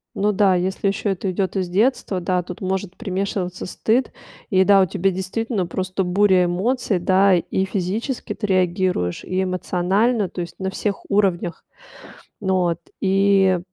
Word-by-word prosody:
Ну 210 Hz, +1 st, +1 dB
да, 195 Hz, -2 st, +3 dB
если 190 Hz, +2 st, -1 dB
ещё 200 Hz, +1 st, 0 dB
это 190 Hz, +1 st, -2 dB
идёт 190 Hz, +2 st, -2 dB
из 185 Hz, -2 st, -1 dB
детства, 205 Hz, 0 st, +1 dB
да, 180 Hz, +1 st, 0 dB
тут 175 Hz, +1 st, -9 dB
может 190 Hz, 0 st, -3 dB
примешиваться 185 Hz, -1 st, -3 dB
стыд. 235 Hz, +7 st, 0 dB, 0.4 s
И 190 Hz, -1 st, +4 dB
да, 195 Hz, 0 st, +6 dB
у -, -, +4 dB
тебя 190 Hz, +1 st, 0 dB
действительно 190 Hz, +1 st, -2 dB
просто 185 Hz, +2 st, -2 dB
буря 185 Hz, 0 st, +3 dB
эмоций, 195 Hz, +3 st, 0 dB
да: 190 Hz, +2 st, +4 dB
и 190 Hz, +2 st, -1 dB
физически 205 Hz, +7 st, -3 dB
ты 205 Hz, -, -4 dB
реагируешь, 180 Hz, -, 0 dB
и 185 Hz, +1 st, -1 dB
эмоционально. 190 Hz, +4 st, 0 dB
Tо 180 Hz, -, -5 dB
есть 170 Hz, -1 st, -8 dB
на 190 Hz, 0 st, -2 dB
всех 200 Hz, +1 st, -2 dB
уровнях. 185 Hz, -4 st, 0 dB, 0.8 s
Вот, 180 Hz, -4 st, +1 dB, 0.2 s
и 195 Hz, -1 st, +3 dB
190 Hz, 155 wpm, -21 LUFS, 180-200 Hz, 0.8 s, да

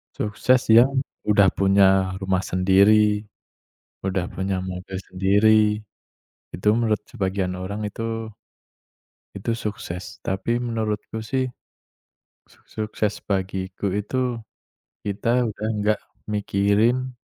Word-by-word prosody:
sukses 120 Hz, +5 st, +2 dB
yang 130 Hz, +4 st, +6 dB, 0.3 s
udah 100 Hz, -2 st, +5 dB
punya 95 Hz, -1 st, +3 dB
rumah 95 Hz, -1 st, +1 dB
sendiri, 105 Hz, +3 st, +3 dB, 0.7 s
udah 95 Hz, -1 st, -1 dB
punya 95 Hz, 0 st, -2 dB
mobil 95 Hz, +1 st, -6 dB
sendiri, 100 Hz, +4 st, +4 dB, 0.9 s
itu 90 Hz, -, -8 dB
menurut 110 Hz, -3 st, +1 dB
sebagian 95 Hz, -5 st, -2 dB
orang 100 Hz, +3 st, -4 dB
itu 115 Hz, +1 st, -4 dB, 1.1 s
itu 100 Hz, +4 st, -2 dB
sukses. 105 Hz, -5 st, -6 dB
Tapi 105 Hz, +5 st, 0 dB
menurutku 110 Hz, -2 st, -3 dB
sih, 130 Hz, +4 st, -1 dB, 1.0 s
suk -, -, -25 dB
sukses 105 Hz, -1 st, -3 dB
bagiku 95 Hz, 0 st, -2 dB
itu 120 Hz, +4 st, -1 dB, 0.6 s
kita 115 Hz, +5 st, +1 dB
udah 105 Hz, 0 st, -5 dB
enggak 105 Hz, +1 st, +1 dB, 0.3 s
mikirin 105 Hz, +5 st, +1 dB
105 Hz, 95 wpm, -23 LUFS, 95-110 Hz, 1.1 s, yang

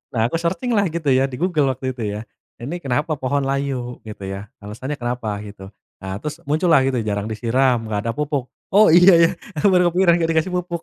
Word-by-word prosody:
Nah, 115 Hz, 0 st, +2 dB
aku 165 Hz, -, -1 dB
searching 170 Hz, +8 st, -2 dB
lah, 205 Hz, -3 st, +2 dB
gitu 160 Hz, -3 st, -1 dB
ya, 130 Hz, +1 st, +3 dB
di 130 Hz, -, -7 dB
Google 160 Hz, -5 st, +1 dB
waktu 130 Hz, +1 st, -3 dB
itu 120 Hz, -2 st, -6 dB
ya. 105 Hz, -, -6 dB, 0.4 s
"Ini 155 Hz, +9 st, -5 dB
kenapa 145 Hz, +4 st, -1 dB
pohon 140 Hz, +2 st, 0 dB
layu?" 135 Hz, -3 st, -3 dB
Gitu 105 Hz, -2 st, -9 dB
ya. 100 Hz, +2 st, -6 dB
"Alasannya 115 Hz, +8 st, -6 dB
kenapa?" 120 Hz, -3 st, -3 dB
Gitu. 100 Hz, -2 st, -10 dB, 0.3 s
Nah, 95 Hz, 0 st, -5 dB
terus 150 Hz, +2 st, -5 dB
muncul 155 Hz, +5 st, +1 dB
lah, 145 Hz, -5 st, +6 dB
gitu, 130 Hz, -, 0 dB
jarang 100 Hz, 0 st, -2 dB
disiram, 120 Hz, +3 st, +1 dB
nggak 105 Hz, -2 st, -2 dB
ada -, -, +1 dB
pupuk. 145 Hz, -3 st, -2 dB, 0.3 s
"Oh, 210 Hz, +2 st, +7 dB
iya, 180 Hz, +3 st, +7 dB
ya!" 165 Hz, 0 st, +6 dB, 0.3 s
Aku 150 Hz, -, +3 dB
baru 180 Hz, -1 st, +4 dB
kepikiran, 175 Hz, 0 st, +4 dB
nggak 165 Hz, -1 st, 0 dB
dikasih 160 Hz, +3 st, 0 dB
pupuk. 175 Hz, -1 st, -3 dB
140 Hz, 215 wpm, -21 LUFS, 120-170 Hz, 0.4 s, Oh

